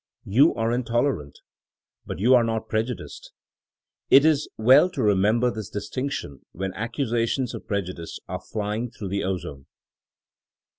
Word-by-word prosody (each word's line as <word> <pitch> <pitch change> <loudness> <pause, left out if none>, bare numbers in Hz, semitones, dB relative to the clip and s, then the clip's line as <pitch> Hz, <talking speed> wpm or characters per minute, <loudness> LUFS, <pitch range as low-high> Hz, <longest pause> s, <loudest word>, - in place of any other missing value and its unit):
You 135 +11 +4
are 115 0 0
intolerant. 120 - -1 0.7
But - - -5
you 120 +7 +4
are 125 -2 +6
not 115 -1 -2
prejudiced. 110 +2 -4 0.8
It 140 +2 +7
is 155 -2 +2
well 130 +10 +6
to 175 -7 -4
remem 105 +1 +3
ber 125 -1 +2
this 110 -4 -6
distinction 105 - -5
when 95 +1 -4
accusations 115 +2 -1
of - - -8
preju 100 -3 -2
dice 85 -2 -8
are - - -5
flying 110 +3 -3
through 100 -3 -7
the 100 +1 -1
ozone. 85 -7 -4
115 Hz, 145 wpm, -24 LUFS, 100-125 Hz, 0.8 s, It